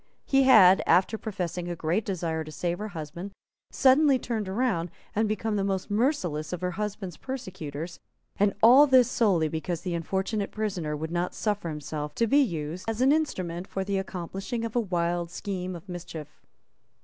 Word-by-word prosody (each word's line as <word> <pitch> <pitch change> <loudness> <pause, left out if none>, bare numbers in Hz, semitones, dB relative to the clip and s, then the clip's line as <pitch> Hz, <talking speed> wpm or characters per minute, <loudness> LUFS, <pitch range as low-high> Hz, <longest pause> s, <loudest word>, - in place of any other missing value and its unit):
He 270 -1 +3
had, 195 -8 +8
after 180 +6 +4
professing 180 -5 -4
a 175 - -3
great 165 +6 0
desire 165 -5 -2
to 155 - -10
save 175 +2 -2
her 210 - -3
husband, 170 +1 -7 0.4
suddenly 275 +1 +5
turned 225 -5 -3
round, 190 -5 0 0.3
and 215 0 +1
become 215 0 -1
the 195 - 0
most 195 0 -2
merciless 205 - 0
of 180 -1 -4
her 180 0 -1
husband's 195 -2 -4
persecutors; 175 - -6 0.4
and 200 0 +2
all 260 +6 +8
this 260 -3 +6
solely 195 -9 +2
because 160 +2 -3
the 180 -1 -3
unfortunate 190 +5 -2
prisoner 185 -8 -3
would 160 +2 -5
not 175 +1 -2
suffer 205 -5 -1
himself 150 0 -5
to 230 - +2
be 280 +6 +4
used 170 - -3
as 225 +2 -2
an 265 +2 +5
instrument 185 - -1
for 195 - -3
the 195 0 -1
accomplishing 195 +5 -4
of 230 - -6
a - - +4
wild 175 -4 -1
scheme 185 0 -4
of 170 +3 -11
mischief. 165 -4 -8
190 Hz, 175 wpm, -27 LUFS, 170-220 Hz, 0.4 s, had